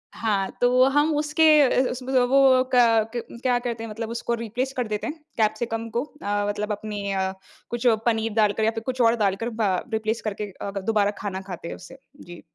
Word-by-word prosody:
हाँ, 200 -4 0
तो 250 +1 +5
हम 295 +3 +2
उसके 300 +2 +1 0.4
इस 260 - +3
उस 255 +1 -5
व 260 0 +2
वो 260 -1 +4
क 225 -2 +4
क्या 245 +1 -1
करते 235 -2 -4
हैं 230 - -6
मतलब 225 +1 -5
उसको 235 0 -3
रिप्लेस 235 +3 -3
कर 245 -3 -1
देते 210 +5 -3
हैं 305 - -3 0.2
कैप्सिकम 225 +1 -1
को। 235 +4 -1
अ, 205 -9 -3
मतलब 210 +1 -3
अपनी 205 -1 -4
अ, 190 -1 0 0.4
कुछ 240 +1 -1 0.2
पनीर 225 -1 +1
डालकर 215 0 +2
या 220 - +3
फ़िर 225 0 -6
कुछ 255 +1 -2
और 230 0 +5
डालकर 210 +2 0
बा 220 -4 0 0.2
रिप्लेस 220 +1 -1
करके 210 -1 -4
अ, 200 +2 -7
दोबारा 205 0 +1
खाना 190 -2 -4
खाते 175 -3 -7
हैं - - -5
उससे। 185 +9 -13 0.2
जी। 175 0 -11
225 Hz, 200 wpm, -24 LUFS, 210-245 Hz, 0.4 s, तो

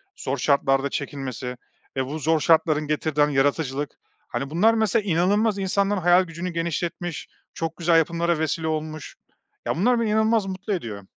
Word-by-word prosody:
zor 135 +2 -3
şartlarda 135 0 +2
çekilmesi, 130 -3 -5 0.4
eee, 135 -1 0
bu 150 +4 -5
zor 160 +1 +2
şartların 155 -1 +3
getirdiği, 150 0 0
hani, 145 -1 +2
yaratıcılık, 140 0 0 0.3
hani, 135 - -4
bunlar, 190 +9 +3
mesela, 220 -1 +1
inanılmaz 200 +4 +2
insanların 195 +1 0
hayal 175 +2 +5
gücünü 170 +1 -5
genişletmiş 170 0 -3 0.3
çok 165 0 -4
güzel 170 -1 +3
yapımlara 170 0 +1
vesile 160 +1 -1
olmuş, 155 -1 -4 0.5
ya - - 0
bunlar 240 +7 +3
beni 230 -2 0
inanılmaz 220 0 +2
mutlu 195 +2 -4
ediyor. 110 - -5
165 Hz, 155 wpm, -24 LUFS, 145-190 Hz, 0.5 s, hayal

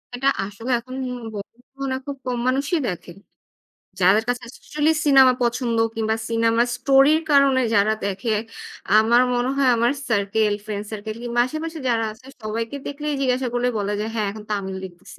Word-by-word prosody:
এটা 270 +2 -1 0.2
আসলে 205 +5 -7
এখন 255 +2 -9
উম 250 -1 -6
বর্তমানে 230 +4 -10
মনে 270 -1 -2
হয় 260 - -5
খুব 280 -1 -5
কম 250 -1 -2
মানুষই 280 +6 +1
দেখেন। 175 -1 -6 0.8
যাদের 190 +4 +5
কাছে 245 0 -1
actually 300 +4 -1
cinema 270 -3 +7
পছন্দ 235 -1 0 0.2
কিংবা 220 0 0
cinema 230 0 +2
story-র 275 +5 +4
কারণে 275 -2 +5
যারা 210 +1 +4
দেখে। 200 +3 -2 0.7
আমার 235 +3 +5
মনে 245 +1 0
হয় 275 -2 +3
আমার 235 +2 +3 0.2
circle, 210 -1 +1
friend 210 -1 -4
circle 215 0 -6
কিংবা 240 0 0
আশেপাশে 320 +4 -5
যারা 230 -2 +1
আছে 250 +5 -18 0.2
সবাইকে 225 +4 -3
দেখলেই 295 +1 -3
জিজ্ঞাসা 255 -1 +1
করলে 245 +1 +1
বলে 205 0 -1
যে 210 - -1
হ্যাঁ 215 -2 0
এখন 210 +1 -9
তামিল 190 -2 -2
দেখতেছি। 185 +1 -12
235 Hz, 170 wpm, -22 LUFS, 215-265 Hz, 0.8 s, cinema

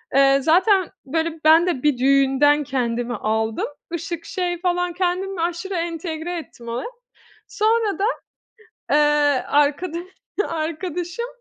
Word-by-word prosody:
eee, 275 0 +6
zaten 370 +4 +3 0.2
böyle 325 +3 -2
ben 325 +3 +6
de 300 -7 -1
bir 295 -4 +3
düğünden 275 +2 +3
kendimi 245 -3 -2
aldım, 220 +1 -1 0.3
ışık 340 0 -4
şey 355 -2 -2
falan 355 -1 0
kendimi 365 0 -1
aşırı 345 +3 -2
entegre 335 0 -3
ettim 240 -7 -10
oraya, 235 - -3 0.6
sonra 435 -1 +1
da, 400 - 0 0.9
eee, 295 -2 +3
arkadaş 300 +4 +1 0.5
arkadaşım 335 +6 -3
325 Hz, 115 wpm, -22 LUFS, 275-355 Hz, 0.9 s, eee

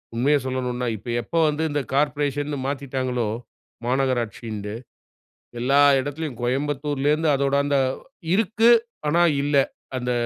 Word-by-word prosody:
உண்மைய 140 +5 +3
சொல்லணும்னா 125 -1 -2
இப்ப 115 - -10
எப்ப 120 - -9
வந்து 150 +1 0
இந்த 145 0 0
கார்ப்பரேஷன்னு 145 0 0
மாத்திட்டாங்களோ? 130 -4 -2 0.6
மாநகராட்சின்ட்டு 115 -5 -1 0.9
எல்லா 135 +4 +3 0.2
இடத்திலும் 145 -1 -4
கோயம்புத்தூரிலிருந்து 145 +4 0
அதோடு 140 0 +1
அந்த 145 0 +1 0.6
"இருக்கு 225 +3 +3 0.4
ஆனா 170 +3 +4 0.2
இல்ல." 145 0 0 0.4
அந்த 125 0 -2
140 Hz, 105 wpm, -23 LUFS, 125-145 Hz, 0.9 s, ஆனா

